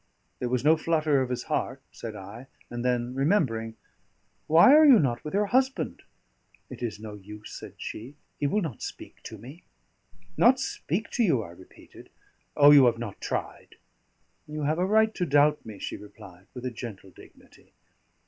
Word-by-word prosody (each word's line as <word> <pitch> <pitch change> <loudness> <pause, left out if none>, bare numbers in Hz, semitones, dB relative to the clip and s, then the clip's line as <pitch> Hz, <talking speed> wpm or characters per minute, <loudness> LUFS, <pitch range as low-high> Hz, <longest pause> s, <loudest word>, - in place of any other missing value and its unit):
"There 125 - -2
was 125 +1 -1
no 160 +2 +5
flutter 155 -3 +1
of 130 - -2
his 125 - -3
heart," - - -2
said 115 -2 -8
I, 105 +6 -10 0.2
and 120 0 -4
then 125 0 -1
remembering: 130 - 0 0.7
"Why 170 - +7
are 310 +1 +8
you 275 -6 +8
not 125 - 0
with 150 - -5
your 210 +1 +2
husband?" 260 +5 0 0.7
"It - - -9
is 110 -4 -4
no 110 -1 -8
use," 105 +1 -11
said - - -10
she; 125 +7 -8 0.2
"he 145 - +1
will 210 +7 0
not 145 -10 -6
speak - - -9
to - - -8
me." 140 +9 -12 0.8
"Not 255 +2 +5
speak 215 - -3
to 240 - +1
you?" 135 - +2
I 85 - -10
repeated. 90 +2 -16 0.5
"Oh! 145 0 +8
you 140 -3 +8
have 120 -1 +1
not 115 -4 -7
tried." - - -5 0.7
"You 150 0 -5
have 155 +3 0
a 180 - +2
right 220 +1 +3
to 185 - -2
doubt 145 +1 +3
me," 105 -2 -8
she - - -5
replied, 95 -3 -14
with 125 0 -7
a 125 - -2
gentle 110 -5 -9
dignity. - - -19
135 Hz, 180 wpm, -27 LUFS, 115-165 Hz, 0.8 s, are